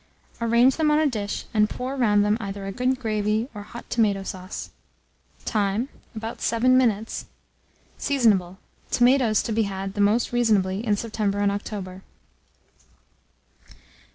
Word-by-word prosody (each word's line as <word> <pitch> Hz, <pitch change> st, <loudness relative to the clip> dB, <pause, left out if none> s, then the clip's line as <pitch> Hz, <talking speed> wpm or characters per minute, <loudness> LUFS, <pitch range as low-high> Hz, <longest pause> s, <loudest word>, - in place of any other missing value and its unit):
Arrange 235 Hz, +3 st, +4 dB
them 315 Hz, -2 st, +2 dB
on 300 Hz, -, +4 dB
a 310 Hz, -, +3 dB
dish, 210 Hz, -7 st, -2 dB
and 210 Hz, -1 st, +3 dB
pour 255 Hz, +2 st, -4 dB
round 205 Hz, -5 st, +3 dB
them 210 Hz, +1 st, +3 dB
either 200 Hz, -2 st, -5 dB
a 195 Hz, -, -3 dB
good 255 Hz, +4 st, 0 dB
gravy 215 Hz, -1 st, 0 dB
or 210 Hz, -, -7 dB
hot 235 Hz, +3 st, -10 dB
tomato 205 Hz, -4 st, +1 dB
sauce. 185 Hz, 0 st, -7 dB, 0.7 s
Time. 210 Hz, +3 st, 0 dB, 0.3 s
About 225 Hz, +1 st, -6 dB
7 245 Hz, +3 st, +3 dB
minutes. 225 Hz, -4 st, +1 dB, 0.7 s
Seasonable. 205 Hz, -10 st, +2 dB, 0.3 s
Tomatoes 245 Hz, -3 st, +3 dB
to -, -, -3 dB
be 225 Hz, +1 st, +2 dB
had 195 Hz, 0 st, -5 dB
most 210 Hz, +4 st, +2 dB
reasonably 210 Hz, -5 st, +1 dB
in 210 Hz, -3 st, +2 dB
September 210 Hz, -2 st, -2 dB
and 205 Hz, 0 st, +2 dB
October. 195 Hz, -2 st, -5 dB
215 Hz, 135 wpm, -24 LUFS, 200-240 Hz, 0.7 s, Arrange